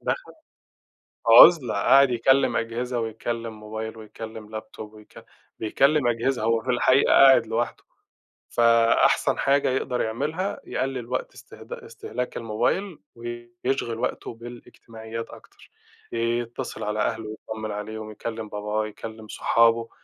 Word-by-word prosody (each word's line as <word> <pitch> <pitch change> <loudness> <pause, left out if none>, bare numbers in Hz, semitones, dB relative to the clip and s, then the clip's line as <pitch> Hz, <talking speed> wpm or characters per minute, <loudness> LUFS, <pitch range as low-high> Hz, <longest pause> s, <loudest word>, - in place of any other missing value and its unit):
دخَل - - -3 1.0
عُزلة، 130 +3 +8
قاعد 135 +7 +5
يكلّم 130 +3 +2
أجهزة 120 +2 -2
ويكلّم 115 0 -4
موبايل 110 +1 -6
ويكلّم 110 0 -9
لابتوب 110 0 -9
ويك 105 -1 -15 0.3
بيكلّم 140 +5 +2
أجهزة، 120 +1 0
هو 115 0 +2
في 130 - -8
الحقيقة 130 +2 +3
قاعد 135 -4 +7
لوحده. 115 +1 -2 0.7
فأحسن 115 -1 +3
حاجة 140 -1 +2
يقدَر 125 -1 -1
يعملها، 155 - -2
يقلّل 130 -3 -3
وقت 130 - -3
إستخد - - -14
إستهلاك 125 0 -6
الموبايل 145 - -1 0.2
ويشغِل 120 +1 -4
وقته 120 - -3
بالإجتماعيات 115 -1 -9
أكتر، - - -16 0.4
يتّصل 120 +2 -3
على 105 0 -2
أهله 110 0 -2
يتطمّن 110 0 -7
عليهم، 110 +1 -6
يكلّم 110 0 -6
باباه، 105 +1 -2
يكلّم 110 0 -9
صحابه، 115 +1 +2
115 Hz, 115 wpm, -24 LUFS, 110-125 Hz, 1.0 s, عُزلة